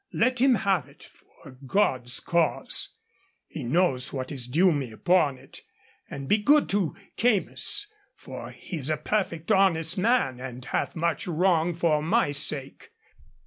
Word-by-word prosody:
Let 250 Hz, +2 st, +1 dB
him 265 Hz, -1 st, +5 dB
have 190 Hz, -, 0 dB
it, 140 Hz, -, -18 dB
for 140 Hz, -, -17 dB, 0.2 s
God's 130 Hz, -8 st, +1 dB
cause. 170 Hz, -1 st, 0 dB, 0.6 s
He 150 Hz, -, -7 dB
knows 130 Hz, -1 st, +1 dB
what 130 Hz, 0 st, -5 dB
is 130 Hz, -4 st, -5 dB
due 175 Hz, +8 st, +3 dB
to -, -, 0 dB
me 135 Hz, -5 st, -3 dB
upon 150 Hz, +2 st, +2 dB
it. -, -, -12 dB, 0.5 s
And 140 Hz, -1 st, -7 dB
be 210 Hz, -, +3 dB
good 290 Hz, +8 st, +4 dB
to 195 Hz, -6 st, 0 dB, 0.2 s
Keymis, 245 Hz, -, +1 dB, 0.3 s
for -, -, -9 dB
he 175 Hz, -, -8 dB
is 145 Hz, -1 st, -1 dB
a 155 Hz, -, 0 dB
perfect 170 Hz, -5 st, -2 dB
honest 175 Hz, -2 st, +3 dB
man, 210 Hz, -, +1 dB
and 125 Hz, -1 st, -8 dB
hath -, -, -2 dB
much 165 Hz, -1 st, -1 dB
wrong 175 Hz, 0 st, +1 dB
for 160 Hz, -3 st, +1 dB
my 175 Hz, +1 st, +1 dB
sake. 140 Hz, -, -2 dB
165 Hz, 155 wpm, -26 LUFS, 140-195 Hz, 0.6 s, him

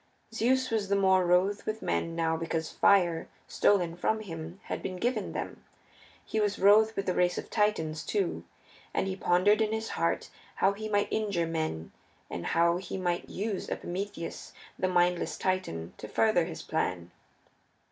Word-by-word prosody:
Zeus 255 Hz, +3 st, +1 dB
was 210 Hz, -3 st, 0 dB
the 200 Hz, -, +3 dB
more 190 Hz, -2 st, +4 dB
wroth 185 Hz, +4 st, +2 dB
with 215 Hz, 0 st, -3 dB
men 165 Hz, 0 st, -1 dB
now 165 Hz, -1 st, +1 dB
because 160 Hz, -1 st, -3 dB
fire, 175 Hz, -5 st, +3 dB, 0.2 s
stolen 175 Hz, -5 st, +2 dB
from 220 Hz, +5 st, 0 dB
him, 165 Hz, -2 st, -7 dB
had -, -, -4 dB
been 185 Hz, -, -4 dB
given 235 Hz, +1 st, -1 dB
them; -, -, -5 dB, 0.6 s
he 220 Hz, -, -2 dB
was 205 Hz, -1 st, +1 dB
wroth 215 Hz, +3 st, +5 dB
with 195 Hz, -, -2 dB
the 185 Hz, -, +1 dB
race 180 Hz, 0 st, +2 dB
of -, -, -6 dB
Titans, 160 Hz, -8 st, 0 dB
too, 405 Hz, -2 st, -1 dB, 0.5 s
and -, -, +1 dB
he 190 Hz, -1 st, -2 dB
pondered 195 Hz, +4 st, +3 dB
in 215 Hz, -1 st, +1 dB
his 220 Hz, 0 st, -2 dB
heart -, -, -1 dB, 0.2 s
how 195 Hz, -, +3 dB
he 215 Hz, +2 st, -6 dB
might 205 Hz, -1 st, +2 dB
injure 200 Hz, -6 st, 0 dB
men, 160 Hz, -, -3 dB, 0.4 s
and 85 Hz, -, -4 dB
how 170 Hz, +1 st, +3 dB
he 185 Hz, +1 st, -5 dB
might 175 Hz, -2 st, -2 dB
use 205 Hz, 0 st, -3 dB
Epimetheus, 180 Hz, -2 st, -5 dB, 0.3 s
the 185 Hz, -, +2 dB
mindless 175 Hz, -1 st, +1 dB
Titan, 85 Hz, -, -2 dB
to 105 Hz, -, -7 dB
further 215 Hz, -, +2 dB
his 165 Hz, -1 st, -7 dB
plan. 90 Hz, -, -2 dB
185 Hz, 165 wpm, -29 LUFS, 170-210 Hz, 0.6 s, wroth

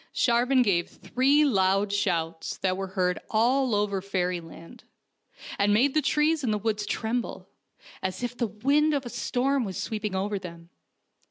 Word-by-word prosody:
Shar 240 Hz, 0 st, +2 dB
van 260 Hz, -1 st, +4 dB
gave 175 Hz, -6 st, +1 dB
three 280 Hz, +4 st, +2 dB
loud 195 Hz, -4 st, +2 dB
shouts 165 Hz, -5 st, -1 dB
that 185 Hz, -1 st, 0 dB
were 195 Hz, 0 st, -4 dB
heard 180 Hz, -1 st, +1 dB
all 245 Hz, +2 st, +2 dB
over 205 Hz, -2 st, 0 dB
fairyland, 180 Hz, +1 st, -4 dB, 0.8 s
and 205 Hz, +1 st, +3 dB
made 265 Hz, +5 st, +3 dB
the 310 Hz, -, +3 dB
trees 300 Hz, +2 st, +1 dB
in 245 Hz, -, 0 dB
the 210 Hz, -, +1 dB
woods 210 Hz, 0 st, -2 dB
tremble, 230 Hz, +2 st, -3 dB, 0.5 s
as 190 Hz, +4 st, -4 dB
if 245 Hz, 0 st, -3 dB
the 240 Hz, -1 st, -1 dB
wind 280 Hz, +9 st, +2 dB
of 275 Hz, -2 st, -2 dB
a -, -, -5 dB
storm 265 Hz, +3 st, 0 dB
was 190 Hz, -5 st, -5 dB
sweeping 210 Hz, -3 st, -3 dB
over 200 Hz, +1 st, -1 dB
them. 170 Hz, -2 st, -11 dB
210 Hz, 165 wpm, -27 LUFS, 190-250 Hz, 0.8 s, van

